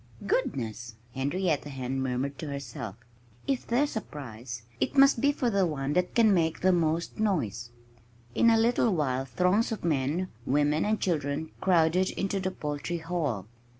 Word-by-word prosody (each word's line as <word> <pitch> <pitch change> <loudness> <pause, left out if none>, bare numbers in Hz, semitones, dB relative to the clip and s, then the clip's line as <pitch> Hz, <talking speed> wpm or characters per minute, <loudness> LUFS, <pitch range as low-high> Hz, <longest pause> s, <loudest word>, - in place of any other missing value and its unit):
"Goodness!" 115 - -2 0.2
Henrietta 145 +3 -1
Hen 135 -1 -3
murmured 130 +2 -2
to 155 - -5
herself. 120 -7 -6 0.5
"If 270 -2 -1
there's 275 +4 +1
a 220 - 0
prize, 120 - -8 0.2
it - - -1
must 275 -3 +6
be 285 - +4
for 255 -4 0
the 195 -3 +3
one 145 -2 -2
that 180 +2 0
can 225 -3 +5
make 165 -3 +1
the 185 - +4
most 165 0 0
noise." 120 - -1 0.6
In 230 - +4
a 225 - +5
little 230 -2 +3
while 135 -4 0
throngs 180 - +1
of 220 - -4
men, 155 +4 0
women 145 +4 +2
and 215 +1 +1
children 155 -2 -1
crowded 180 0 +3
into 195 0 -2
the 185 0 -1
Poultry 150 0 -4
Hall. 160 - -2
160 Hz, 160 wpm, -28 LUFS, 135-190 Hz, 0.6 s, must